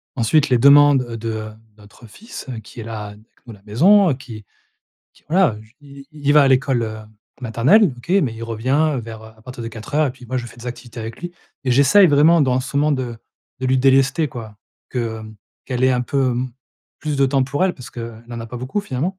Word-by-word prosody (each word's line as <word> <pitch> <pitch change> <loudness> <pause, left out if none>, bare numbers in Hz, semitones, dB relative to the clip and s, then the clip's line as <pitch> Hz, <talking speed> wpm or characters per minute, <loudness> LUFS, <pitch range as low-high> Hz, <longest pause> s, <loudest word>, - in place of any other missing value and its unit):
ensuite, 140 +5 +2
les 125 - +4
demandes, 140 +1 +6
heu, 115 -1 -6
de 110 -1 -4 0.3
notre 105 +3 -17
fils 220 - -11 0.2
qui 105 +3 -13
est - - -7
là 110 -2 -6
avec 105 0 -12 0.3
nous, 120 - -10
à - - -14
la 100 - -26
maison, 170 - +4
qui 115 -5 -11 0.7
qui - - -26
voilà, 170 - +2
j 110 +2 -23
i 140 -1 -14
il 145 -1 0
va 150 0 +6
à 135 - +3
l'école, 130 -2 +2
heu, 110 0 -6 0.4
maternelle 130 - +3
OK. 120 - -15
Mais 120 -6 -2
il 115 +1 -7
revient 130 +6 0
vers, 110 -1 -9
heu - - -11
à - - -20
partir 125 0 -9
de 115 - -5
4:00 130 +7 -2
et 130 - -3
puis 125 -1 -15
moi 130 +2 -3
je 120 - -6
fais 120 - -14
des 120 - -10
activités 120 -1 -9
avec 115 +1 -7
lui 175 0 -6 0.3
et 130 - 0
j'essaye, 140 +10 +6
vraiment, 155 +3 +5
dans 130 -2 +1
ce 135 +2 -6
moment 150 +1 +2
de 125 -4 -3 0.4
de 130 - -1
lui 130 0 +2
délester 135 +4 +3
quoi, 110 -4 -9 0.3
que 115 -3 -3 0.4
qu'elle 125 -1 -3
ait 130 - +4
un 125 -1 0
peu 130 +1 0
m 125 +1 -3 0.5
plus 150 -2 -3
de 135 0 +3
temps 135 0 +1
pour 145 +7 -1
elle, 190 - 0
parce 125 - -11
qu'elle 115 -1 -9
n'en 120 -1 -6
a 115 - -7
pas 125 - -8
beaucoup 130 - -3
finalement 180 +2 -4
130 Hz, 230 wpm, -20 LUFS, 115-145 Hz, 0.7 s, demandes